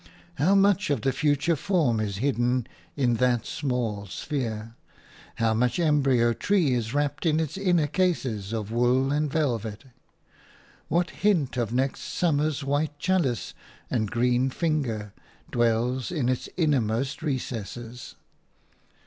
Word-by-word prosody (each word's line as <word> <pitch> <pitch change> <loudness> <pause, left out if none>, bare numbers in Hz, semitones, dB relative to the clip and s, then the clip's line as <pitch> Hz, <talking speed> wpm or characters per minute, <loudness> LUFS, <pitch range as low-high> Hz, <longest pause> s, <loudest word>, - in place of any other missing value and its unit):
How 185 +7 +4
much 195 -1 +3
of 140 -6 +1
the 135 - +1
future 150 +4 +1
form 150 - +1
is 100 -2 -2
hidden 125 0 +1 0.3
in 125 -5 +1
that 125 -2 +2
small 120 -7 -2
sphere? 115 - -4 0.6
How 115 -1 +1
much 120 +2 +1
embryo 135 -8 +3
tree 175 - +2
is 115 -2 -1
wrapped 145 +1 -1
in 160 -2 +2
its 160 -2 -2
inner 180 -5 +2
cases 135 - -1
of 110 -2 -3
wool 125 +3 +2
and 150 0 0
velvet? 115 -8 -1 1.0
What 175 +3 +1
hint 170 -12 +1
of 120 -3 -1
next 130 +2 0
summer's 155 -3 0
white 145 +2 -1
chalice 150 -7 0 0.4
and 110 -5 0
green 125 +2 +2
finger 125 - -2 0.4
dwells 120 +3 +1
in 145 -8 0
its 130 - -2
innermost 135 -4 0
recesses? 125 -4 -5
130 Hz, 130 wpm, -26 LUFS, 115-150 Hz, 1.0 s, How